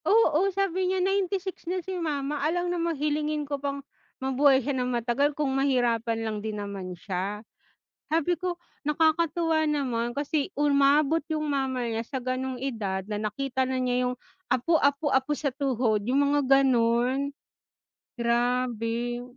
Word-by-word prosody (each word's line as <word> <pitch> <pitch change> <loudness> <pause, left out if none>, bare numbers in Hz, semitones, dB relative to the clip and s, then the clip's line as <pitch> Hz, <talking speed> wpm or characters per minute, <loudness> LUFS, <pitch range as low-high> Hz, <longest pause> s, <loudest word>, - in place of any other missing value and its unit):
Oo, 390 -4 +4
sabi 375 -1 0
niya, 380 - +1
"96 380 -1 -1
na 370 - 0
si 380 - -4
mama, 290 -2 -2
alangan 350 +4 0
namang 335 -2 -1
hilingin 300 +1 -1
ko 285 -1 -4
pang 280 -1 -3 0.3
mabuhay 265 +1 +4
siya 285 - 0
nang 250 -1 -1
matagal, 250 +4 0
kung 285 -3 0
mahirapan 245 -4 +1
lang 215 -1 -2
din 215 0 -4
naman 195 -3 -6
siya". 200 +4 -4 0.7
Sabi 330 +2 +2
ko, 355 -1 -4 0.2
nakakatuwa 320 +1 +2
naman 255 -6 -1
kasi 285 +2 -1
umabot 290 +2 +3
yung 305 -1 -1
mama 265 -4 -1
niya, 225 0 -2
sa 265 +2 -4
gano'ng 255 0 -3
edad, 210 -8 -2
na 210 - -2
nakita 255 +5 -1
na 260 0 -1
niya 250 0 +1
yung 250 - -2 0.4
apo, 260 +7 +3
apo, 285 0 +2
apo 265 +2 +2
sa 295 0 -1
tuhod, 250 -6 0
yung 260 +5 +2
mga 275 -2 +4
gano'n. 255 +2 +2 0.9
Grabe. 240 0 0
275 Hz, 150 wpm, -27 LUFS, 240-305 Hz, 0.9 s, Oo